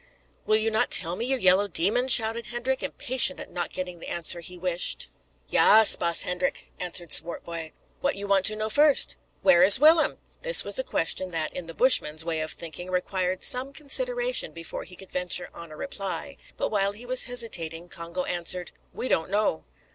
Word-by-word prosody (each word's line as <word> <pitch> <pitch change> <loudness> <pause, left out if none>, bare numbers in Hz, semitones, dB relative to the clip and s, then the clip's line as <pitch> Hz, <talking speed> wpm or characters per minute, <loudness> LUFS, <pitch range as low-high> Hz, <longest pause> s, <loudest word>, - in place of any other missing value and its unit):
"Will 215 - +3
you 220 +1 +1
not 220 +3 +1
tell 170 +2 +4
me, 230 - -4
you 265 +1 +1
yellow 190 -1 +3
demon?" 205 +8 +2
shouted 230 -2 +3
Hendrik, 250 +2 -3
impatient 250 -7 -1
at - - -9
not 175 - -4
getting 180 -2 -6
the - - -10
answer 170 0 0
he 180 +2 -8
wished. 180 0 -1 0.4
"Yaas, 220 0 +5
baas 170 -1 +1
Hendrik," 180 0 -3
answered 175 -2 -2
Swartboy; 165 -1 -3 0.3
"what 280 +1 -1
you 200 - -6
want 195 -1 +1
to 215 - 0
know 215 0 -3
first?" 290 +5 +4 0.3
"Where 185 -3 +5
is 190 +3 +8
Willem?" 310 +2 +4 0.2
This - - +5
was - - -1
a - - 0
question 190 - -1
that, 160 -3 -3
in 180 -2 -6
the 165 - -10
Bushman's 160 -11 +3
way 165 -2 -2
of 155 0 -4
thinking, 170 +2 -9
required 185 0 -2
some 255 +2 +2
consideration - - -1
before 165 0 -7
he 180 - -14
could 190 +1 -15
venture 180 0 -1
on 170 - -11
a 155 - -12
reply; 195 - -5 0.2
but - - -2
while 200 -1 0
he 225 +4 -13
was 255 +1 +4
hesitating, 175 -9 -2
Congo 170 +2 -6
answered, 175 0 -3 0.2
"We 255 - -4
don't 160 -7 0
know." 205 -4 -1
185 Hz, 190 wpm, -25 LUFS, 175-240 Hz, 0.4 s, is